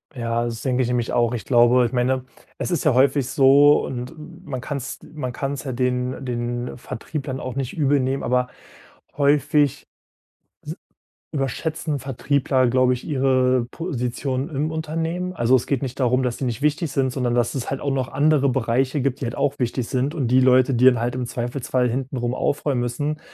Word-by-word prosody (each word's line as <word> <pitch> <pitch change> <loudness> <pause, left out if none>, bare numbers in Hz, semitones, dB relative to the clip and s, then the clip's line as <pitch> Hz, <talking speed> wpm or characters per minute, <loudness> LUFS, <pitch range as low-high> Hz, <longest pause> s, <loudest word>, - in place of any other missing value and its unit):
Ja, 115 -1 -1
das 115 -1 -4
denke 130 -1 +1
ich 125 - +1
nämlich 120 -1 -1
auch. 120 0 +2
Ich 115 - -6
glaube 120 0 +5
ich 115 - -2
meine, 130 +1 0 0.3
es - - -3
ist 170 - 0
ja 150 - +3
häufig 130 0 +3
so 140 +1 +5
und 125 0 -5 0.4
man 130 -3 -4
kann 145 +3 -4
es 135 -1 -6
man 130 -5 -4
kann 135 +2 -3
es 140 - -6
ja 135 - -3
den 125 +1 -1
den 120 0 -3
Vertrieb 140 +5 -6
dann 130 -2 -4
auch 130 -2 -5
nicht 135 +1 -4
übelnehmen, 135 -2 +1
aber 125 +1 +1 0.7
häufig 145 0 +2 0.8
s - - -6 0.6
überschätzen 150 +2 -2
Vertriebler, 135 0 +1
glaube 125 +1 +3
ich, 125 - -6
ihre 130 -3 +2
Position 130 -4 -3
im 150 +1 -2
Unternehmen. 165 +3 -3
Also, 130 -5 +3
es 125 - -5
geht 140 -3 0
nicht 130 -1 -5
darum, 130 0 +2
dass 125 -2 -1
sie 135 - -3
nicht 120 0 -3
wichtig 150 +1 0
sind, 135 -2 +1
sondern 125 -2 -1
dass 120 +1 +1
es 130 - -3
halt 135 - -3
auch 140 - -1
noch 130 -2 -1
andere 145 0 +2
Bereiche 130 +3 0
gibt, 135 0 -1
die - - -3
halt 115 - -4
auch 145 +1 -1
wichtig 125 -1 -2
sind 135 +4 -1
und 135 -7 -1
die 130 +1 +5
Leute, 130 0 +4
die 125 +1 +3
dann 125 -3 +6
halt 120 +1 -1
im 125 0 -3
Zweifelsfall 125 +1 -1
hintenrum 125 -1 -2
aufräumen 140 0 0
müssen, 145 +6 -2
130 Hz, 195 wpm, -22 LUFS, 125-140 Hz, 0.8 s, dann